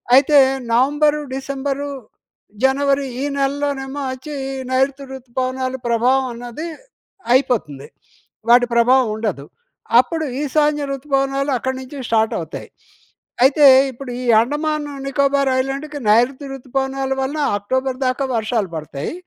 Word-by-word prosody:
అయితే, 285 +2 +6 0.3
November, 295 +4 +2
December, 275 +1 -3 0.7
జనవరి, 275 +1 +2 0.2
ఈ - - -1
నెలలోనేమో 280 0 -2
ఓచ్చీ, 260 +4 -8 0.4
నైరుతి 270 +2 +1
ఋతుపవనాల 260 0 -3
ప్రభావం 250 +3 +2
అన్నది 240 +6 -7 0.7
అయిపోతుంది. 205 - 0 0.6
వాటి 245 +1 +6
ప్రభావవుండదు. 225 - +2 0.5
అప్పుడు 315 +6 0 0.2
ఈశాన్య 295 +1 +1
ఋతుపవనాలు 275 0 -1
అక్కడి 260 +2 -3
నుంచి 260 +2 -10
స్టార్టవుతాయి. 220 -1 -1 0.8
అయితే, 285 +2 +6 0.2
ఇప్పుడీ 250 0 -8 0.3
అండమాను 295 +3 -2
నికోబార్ 275 0 +1
ఐలాండ్‌కి 280 +3 -4
నైరుతి 255 +6 +2
ఋతుపవనాల 270 +1 -3
వలన, 285 +4 -3 0.2
అక్టోబర్ 260 +5 -2
దాకా 255 +2 -1
వర్షాలు 220 -4 -1
పడతాయి. 150 - -5
265 Hz, 100 wpm, -19 LUFS, 245-280 Hz, 0.8 s, అయితే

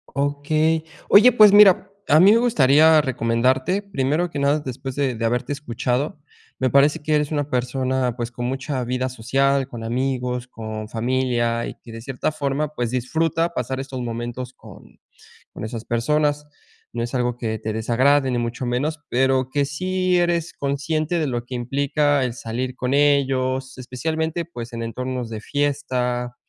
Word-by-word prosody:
Okey. 155 +3 0 0.2
Oye, 225 +5 +8
pues, 215 -3 +7
mira 205 -3 +7 0.3
a 155 - +7
mí 195 +4 +7
me 230 - +5
gustaría 155 - +5
recomendarte 130 - 0
primero 165 -1 -1
que 145 - -4
nada, 140 +2 +2
después 130 0 -6
de 140 -3 0
de 115 +1 -2
haberte 120 +4 -1
escuchado 140 +2 -2 0.4
me 130 -1 0
parece 140 +2 +4
que 155 +1 0
eres 150 0 0
una 145 -1 -1
persona, 130 0 -1
pues, 120 0 -4
con 120 0 -5
mucha 135 0 -3
vida 125 +1 -1
social, 135 +3 0
con 115 -2 -7
amigos, 125 0 -2
con 110 -2 -7
familia 120 0 0
y - - -7
que 115 - -14
de 115 - -8
cierta 130 +4 -2
forma, 145 0 -1
pues, 120 -4 -2
disfruta 165 +7 0
pasar 130 -1 -3
estos 135 -1 -5
momentos 120 +1 -5
con - - -16 0.5
con - - -8
esas 115 0 -6
personas. 150 +5 0 0.5
No 120 - -3
es 120 +2 -4
algo 125 -1 0
que 110 -2 -3
te 110 0 -4
desagrade 130 +5 +2
ni 120 - 0
mucho 120 +2 -3
menos, 145 +6 -1
pero 130 0 +1
que 145 0 0
sí 185 +5 0
eres 175 -1 0
consciente 155 +4 -1
de 155 - 0
lo 120 -2 -3
que 125 - -6
implica 140 +3 +1
el 125 -2 -2
salir 125 +2 -4
con 125 +1 -2
ellos, 135 -2 +1
especialmente, 160 +6 -3
pues, 120 -8 -8
en 115 0 -4
entornos 125 +1 -4
de 110 -1 -5
fiesta, 125 -4 -2
130 Hz, 170 wpm, -22 LUFS, 120-150 Hz, 0.5 s, Oye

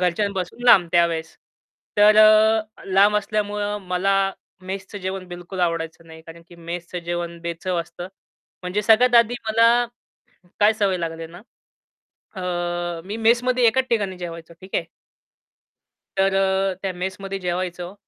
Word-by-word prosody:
घरच्यांपासून 185 +4 -2
लांब 180 -8 +6
त्यावेळेस. 165 -2 +1 0.6
तर 210 +1 +6
अ, 215 0 +4
लांब 200 +2 +4
असल्यामुळं 210 0 -2
मला 185 +2 +1 0.5
मेसचं 195 +1 -6
जेवण 190 0 -5
बिलकुल 175 +1 -7
आवडायचं 165 -1 -2
नाही. 160 0 -13
कारण 165 +1 -13
की 175 - -15
मेसचं 170 +1 -6
जेवण 170 0 -4
बेचव 170 +2 -3
असतं. 175 +1 -8 0.5
म्हणजे 185 +4 -2
सगळ्यात 235 +4 +4
आधी 240 +2 -6
मला 230 +2 +4 0.7
काय 210 +1 +6
सवय 200 -4 0
लागली 165 -1 -4
ना? 175 +4 -13 1.0
अ, 175 -1 -3
मी 205 +3 -5
मेसमध्ये 240 +2 +2
एकाच 260 +3 +2
ठिकाणी 200 -5 -1
जेवायचो, 170 -1 -8
ठीक 190 +1 -7
आहे? - - 0 1.3
तर 195 0 +2
अ, 195 0 +1
त्या 195 - -2
मेसमध्ये 190 +2 -5
जेवायचो, 180 0 -4
190 Hz, 135 wpm, -22 LUFS, 175-210 Hz, 1.3 s, लांब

